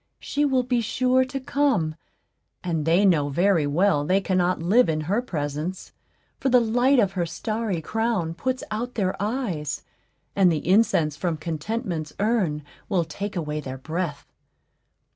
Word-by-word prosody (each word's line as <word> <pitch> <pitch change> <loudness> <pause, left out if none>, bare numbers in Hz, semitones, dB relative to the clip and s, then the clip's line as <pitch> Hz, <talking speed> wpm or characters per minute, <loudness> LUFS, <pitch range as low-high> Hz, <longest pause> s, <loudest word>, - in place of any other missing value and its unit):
She 290 +1 0
will 265 -3 +2
be 245 -1 +1
sure 255 +3 +2
to 270 +1 -5
come; 265 - +1 0.7
and 165 -4 -1
they 175 +5 +4
know 155 -7 +3
very 170 0 +2
well 155 0 +2
they 185 +6 +2
cannot 185 -2 +1
live 190 +5 +3
in 155 -1 0
her 195 +10 0
presence; 155 - -4 0.5
for 270 - 0
the 250 -1 +6
light 245 +4 +3
of 200 -6 +3
her 175 -3 -2
starry 215 -3 -3
crown 220 -5 -1
puts 255 +8 -2
out 240 +4 -3
their 190 -4 0
eyes, 200 - -2 0.5
and 190 -3 +5
the 155 -1 -2
incense 180 -6 +3
from 165 0 -2
Contentment's 165 - -4
urn 200 -9 +1 0.3
will 185 -5 +2
take 200 +7 -5
away 150 -3 -2
their 130 -2 -6
breath. 160 +2 -4
185 Hz, 155 wpm, -24 LUFS, 160-230 Hz, 0.7 s, the